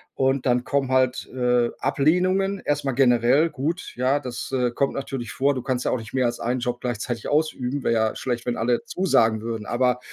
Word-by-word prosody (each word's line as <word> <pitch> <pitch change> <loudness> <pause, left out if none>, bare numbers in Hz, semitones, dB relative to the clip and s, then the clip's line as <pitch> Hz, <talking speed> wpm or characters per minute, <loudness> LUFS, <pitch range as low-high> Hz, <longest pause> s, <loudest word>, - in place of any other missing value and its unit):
Und 135 0 +1
dann 125 0 +2
kommen 135 -1 -1
halt, 130 -1 +1
äh, 125 -1 +2
Ablehnungen. 185 +6 +1
Erstmal 140 -3 -1
generell 130 +4 +4
gut, 160 +6 -3
ja, 130 +3 +1
das, 125 -1 -6
äh, 125 -2 +1
kommt 135 +3 0
natürlich 135 -4 -5
vor. 140 +3 +1
Du 130 - -4
kannst 125 0 -2
ja - - +1
auch 125 - 0
nicht 110 -1 -11
mehr 130 -2 +2
als 120 0 -1
einen 125 +2 -1
Job 120 0 -3
gleichzeitig 120 -1 -3
ausüben, 145 -3 -1
wäre 115 - +2
ja 110 -1 +1
schlecht, 120 -2 -3
wenn 120 - -1
alle 120 +2 0
zusagen 115 - +2
würden. 115 -2 -5
Aber 125 +1 +1
125 Hz, 200 wpm, -24 LUFS, 120-140 Hz, -, generell